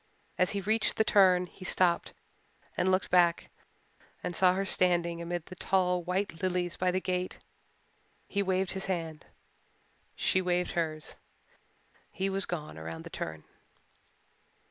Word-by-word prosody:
As 180 Hz, -, +4 dB
he -, -, -1 dB
reached 215 Hz, +3 st, +1 dB
the 220 Hz, -, +4 dB
turn 185 Hz, -4 st, +5 dB
he 185 Hz, -, -14 dB
stopped 180 Hz, -2 st, +1 dB, 0.6 s
and 185 Hz, -, +1 dB
looked 185 Hz, +1 st, 0 dB
back 175 Hz, -2 st, +3 dB, 0.7 s
and 175 Hz, -, -3 dB
saw 185 Hz, 0 st, +5 dB
her 195 Hz, +1 st, -1 dB
standing 175 Hz, -2 st, +2 dB
amid 170 Hz, -1 st, -4 dB
the 185 Hz, -, -10 dB
tall 180 Hz, -1 st, +1 dB
white 180 Hz, -1 st, -2 dB
lilies 180 Hz, -2 st, -1 dB
by 185 Hz, -, +1 dB
the 185 Hz, +1 st, +1 dB
gate. 185 Hz, -1 st, -2 dB, 0.9 s
He 200 Hz, -, 0 dB
waved 190 Hz, -1 st, 0 dB
his 190 Hz, 0 st, -4 dB
hand 165 Hz, -4 st, -4 dB, 0.9 s
she 190 Hz, -, +2 dB
waved 180 Hz, -1 st, 0 dB
hers 155 Hz, -2 st, -3 dB, 0.9 s
he 195 Hz, +2 st, -2 dB
was 195 Hz, +1 st, -1 dB
gone 155 Hz, -, -5 dB
around 80 Hz, 0 st, -7 dB
the -, -, -10 dB
turn. 80 Hz, -1 st, -5 dB
180 Hz, 145 wpm, -30 LUFS, 170-190 Hz, 0.9 s, turn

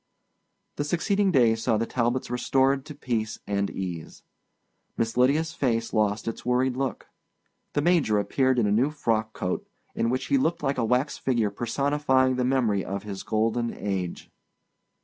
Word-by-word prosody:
The 145 Hz, -, 0 dB
succeeding 195 Hz, +6 st, +1 dB
days 115 Hz, -6 st, +3 dB
saw 115 Hz, -1 st, +2 dB
the 115 Hz, -, 0 dB
Talbots 120 Hz, +1 st, -1 dB
restored 135 Hz, +2 st, +1 dB
to 150 Hz, -, -8 dB
peace 115 Hz, -4 st, -2 dB
and 100 Hz, 0 st, -1 dB
ease. 90 Hz, -4 st, -6 dB, 0.7 s
Miss 115 Hz, 0 st, -1 dB
Lydia's 145 Hz, +6 st, +2 dB
face 115 Hz, -7 st, -1 dB
lost 105 Hz, -1 st, +1 dB
its 115 Hz, -, -4 dB
worried 125 Hz, +1 st, +1 dB
look. 130 Hz, -4 st, -3 dB, 0.7 s
The 145 Hz, -, 0 dB
major 165 Hz, -11 st, +3 dB
appeared 130 Hz, +5 st, +1 dB
in 120 Hz, -, +3 dB
a 100 Hz, -, +1 dB
new 120 Hz, +7 st, +3 dB
frock 115 Hz, -7 st, -1 dB
coat, 90 Hz, -, -3 dB, 0.3 s
in 115 Hz, -, 0 dB
which 130 Hz, +1 st, -1 dB
he 280 Hz, -, +2 dB
looked 170 Hz, -9 st, 0 dB
like 135 Hz, -2 st, 0 dB
a 115 Hz, -, +1 dB
wax 125 Hz, +5 st, 0 dB
figure 115 Hz, -6 st, +1 dB
personifying 130 Hz, +3 st, +1 dB
the 125 Hz, -, +1 dB
memory 125 Hz, -6 st, +1 dB
of 100 Hz, +1 st, -4 dB
his 100 Hz, -2 st, -6 dB
golden 115 Hz, +2 st, 0 dB
age. 95 Hz, -3 st, -4 dB
125 Hz, 165 wpm, -26 LUFS, 110-135 Hz, 0.7 s, days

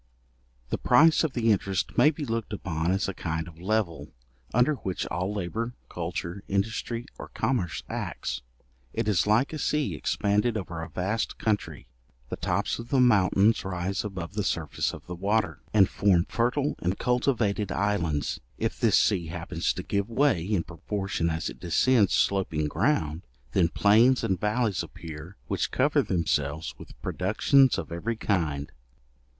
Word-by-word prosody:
The -, -, -1 dB
price 160 Hz, +7 st, +5 dB
of 155 Hz, -5 st, -1 dB
the 115 Hz, -2 st, +2 dB
interest 95 Hz, -2 st, 0 dB
may 150 Hz, -, +6 dB
be 150 Hz, -1 st, -4 dB
looked 115 Hz, -2 st, -3 dB
upon 85 Hz, -4 st, -2 dB
as 95 Hz, 0 st, 0 dB
a 100 Hz, -, -3 dB
kind 80 Hz, -2 st, -3 dB
of 85 Hz, 0 st, -13 dB
level, 100 Hz, -4 st, -1 dB, 0.4 s
under 125 Hz, +6 st, +3 dB
which 95 Hz, -6 st, -3 dB
all 90 Hz, +3 st, -2 dB
labour, 110 Hz, +5 st, -3 dB
culture, 85 Hz, +2 st, -4 dB
industry, 110 Hz, +4 st, -2 dB
or -, -, -7 dB
commerce, 110 Hz, -8 st, -1 dB
acts. -, -, -4 dB, 0.5 s
It 115 Hz, -1 st, -1 dB
is 105 Hz, -2 st, +2 dB
like 115 Hz, +8 st, +3 dB
a 155 Hz, -, -4 dB
sea 150 Hz, -1 st, 0 dB
expanded 105 Hz, +2 st, 0 dB
over 85 Hz, -5 st, -5 dB
a 80 Hz, -, -6 dB
vast 105 Hz, +5 st, -2 dB
country; 105 Hz, -2 st, -2 dB, 0.4 s
the -, -, -3 dB
tops -, -, -1 dB
of 115 Hz, 0 st, -8 dB
the 135 Hz, -, +2 dB
mountains 105 Hz, -2 st, +4 dB
rise 95 Hz, +1 st, -2 dB
above 95 Hz, -4 st, -5 dB
the 105 Hz, 0 st, -1 dB
surface 80 Hz, -6 st, -1 dB
of -, -, -10 dB
the 90 Hz, -, -6 dB
water, 100 Hz, +4 st, 0 dB
and 100 Hz, -3 st, +5 dB
form 95 Hz, -4 st, +2 dB
fertile 125 Hz, +5 st, 0 dB
and 90 Hz, +2 st, -1 dB
cultivated 120 Hz, -5 st, +1 dB
islands. 85 Hz, -8 st, 0 dB, 0.2 s
If -, -, -2 dB
this -, -, +4 dB
sea 90 Hz, -6 st, +2 dB
happens 85 Hz, +1 st, -2 dB
to 95 Hz, -, -5 dB
give 100 Hz, +3 st, -1 dB
way, 115 Hz, -, +2 dB
in 95 Hz, -2 st, 0 dB
proportion 95 Hz, -2 st, -3 dB
as 80 Hz, 0 st, -2 dB
it -, -, -7 dB
descends, 105 Hz, +4 st, +3 dB
sloping 90 Hz, -6 st, +1 dB
ground, 80 Hz, -, 0 dB, 0.3 s
then 85 Hz, +3 st, +3 dB
plains 115 Hz, +8 st, +4 dB
and 95 Hz, -2 st, 0 dB
vallies 105 Hz, -1 st, 0 dB
appear, 80 Hz, +3 st, -9 dB
which -, -, -1 dB
cover -, -, +2 dB
themselves 75 Hz, -3 st, -1 dB
with -, -, -13 dB
productions 130 Hz, +8 st, +3 dB
of -, -, -5 dB
every 100 Hz, +8 st, -2 dB
kind. 80 Hz, -10 st, -1 dB
100 Hz, 160 wpm, -27 LUFS, 85-115 Hz, 0.5 s, may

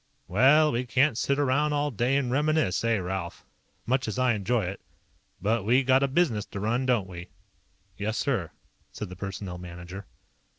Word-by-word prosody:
"Well, 140 Hz, -, +5 dB
we 120 Hz, +2 st, -1 dB
can't 130 Hz, +3 st, +3 dB
sit 140 Hz, +4 st, 0 dB
around 145 Hz, +2 st, +2 dB
all 145 Hz, 0 st, 0 dB
day 125 Hz, +4 st, +1 dB
and 130 Hz, -3 st, -1 dB
reminisce, 150 Hz, -, +1 dB
eh, 115 Hz, -1 st, +2 dB
Ralph? 90 Hz, -2 st, -5 dB, 0.4 s
Much 130 Hz, 0 st, 0 dB
as 110 Hz, -, -3 dB
I 130 Hz, -1 st, +3 dB
enjoy 110 Hz, +2 st, 0 dB
it. 95 Hz, +2 st, -6 dB, 0.6 s
But 110 Hz, +2 st, 0 dB
we 125 Hz, +6 st, +3 dB
got 130 Hz, +1 st, +4 dB
a 140 Hz, -, +3 dB
business 135 Hz, -8 st, +1 dB
to 100 Hz, -, -7 dB
run, 120 Hz, +5 st, 0 dB
don't 120 Hz, -7 st, +2 dB
we?" 90 Hz, -1 st, -9 dB, 0.7 s
"Yes, 105 Hz, +2 st, -2 dB
sir," 110 Hz, -, -1 dB, 0.4 s
said -, -, -6 dB
the 90 Hz, -, -8 dB
Personnel 95 Hz, -1 st, -6 dB
Manager. 90 Hz, +2 st, -9 dB
115 Hz, 175 wpm, -27 LUFS, 95-135 Hz, 0.7 s, Well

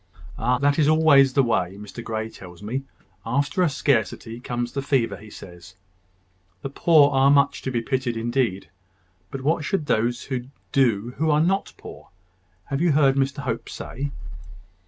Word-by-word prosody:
"Ah! 125 Hz, +2 st, +1 dB
that 145 Hz, +3 st, +1 dB
is 150 Hz, -, +4 dB
always 155 Hz, -4 st, +5 dB
the 135 Hz, -, +4 dB
way, 100 Hz, -6 st, -1 dB
Mr 105 Hz, +3 st, -9 dB
Grey 110 Hz, -1 st, -3 dB
tells 90 Hz, -3 st, -13 dB
me. 130 Hz, +6 st, -4 dB, 0.4 s
After 140 Hz, -, 0 dB
a 175 Hz, -, +3 dB
scarcity 115 Hz, -4 st, -1 dB
comes 120 Hz, -1 st, -4 dB
the 140 Hz, -, -3 dB
fever, 125 Hz, -7 st, 0 dB
he 105 Hz, +2 st, -13 dB
says. 90 Hz, -1 st, -13 dB, 0.9 s
The 135 Hz, -, -4 dB
poor 150 Hz, -1 st, +4 dB
are 135 Hz, 0 st, +4 dB
much 140 Hz, -1 st, +3 dB
to -, -, -3 dB
be 120 Hz, -2 st, -1 dB
pitied 130 Hz, -2 st, -2 dB
indeed. 120 Hz, -4 st, -1 dB, 0.6 s
But 135 Hz, -, -6 dB
what 155 Hz, +3 st, 0 dB
should 155 Hz, +1 st, -1 dB
those 120 Hz, 0 st, 0 dB, 0.4 s
do 120 Hz, -3 st, +1 dB
who 160 Hz, +3 st, +1 dB
are 150 Hz, 0 st, +3 dB
not 190 Hz, +5 st, 0 dB
poor, -, -, -12 dB, 0.6 s
have 140 Hz, +2 st, -1 dB
you 170 Hz, -3 st, +3 dB
heard 140 Hz, -2 st, +4 dB
Mr 140 Hz, +1 st, -1 dB
Hope 115 Hz, -3 st, -4 dB
say?" 140 Hz, +3 st, -5 dB
135 Hz, 165 wpm, -23 LUFS, 115-145 Hz, 0.9 s, always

